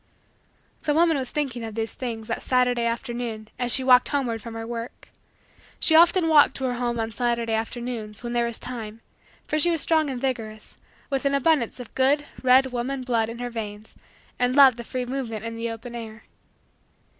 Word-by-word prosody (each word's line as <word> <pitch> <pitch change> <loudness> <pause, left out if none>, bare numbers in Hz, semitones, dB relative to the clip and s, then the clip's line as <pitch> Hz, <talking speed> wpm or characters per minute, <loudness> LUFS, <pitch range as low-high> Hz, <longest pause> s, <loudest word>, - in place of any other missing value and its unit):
The 295 - 0
woman 330 0 +4
was 260 -3 -2
thinking 265 -6 -3
of 220 -2 -6
these 225 0 -3
things 225 -4 -5
that - - -3
Saturday 250 -2 +1
afternoon 230 -2 -4
as 245 -1 +1
she 265 - +3
walked 255 -1 +5
homeward 245 -6 -1
from 230 0 -8
her 225 0 -5
work. 230 +1 -7 0.7
She 320 - +3
often 340 +1 +6
walked 295 -4 +5
to 265 - -3
her 255 -1 0
home 240 -1 -2
on 225 0 -2
Saturday 235 0 -1
afternoons, 225 -1 -4
when 240 0 -4
there 235 0 +1
was 235 - -4
time, 225 -3 -7 0.4
for 305 - -1
she 345 - +5
was 330 -2 +1
strong 315 -1 +2
and 260 -2 -4
vigorous, 225 -5 -4 0.4
with 270 -1 0
an 280 0 +2
abundance 280 -4 +1
of 245 - -9
good 280 +3 +2 0.2
red 260 +1 +4
woman 255 +2 -3
blood 230 -3 0
in 230 - -7
her 245 0 -5
veins, 215 -2 -7 0.5
and 250 +1 +1
loved 270 -4 +7
the 235 - -6
free 250 +2 -4
movement 240 -4 -4
in 230 0 -5
the 230 0 -3
open 230 +2 -8
air. 225 -1 -8
245 Hz, 195 wpm, -24 LUFS, 230-265 Hz, 0.7 s, loved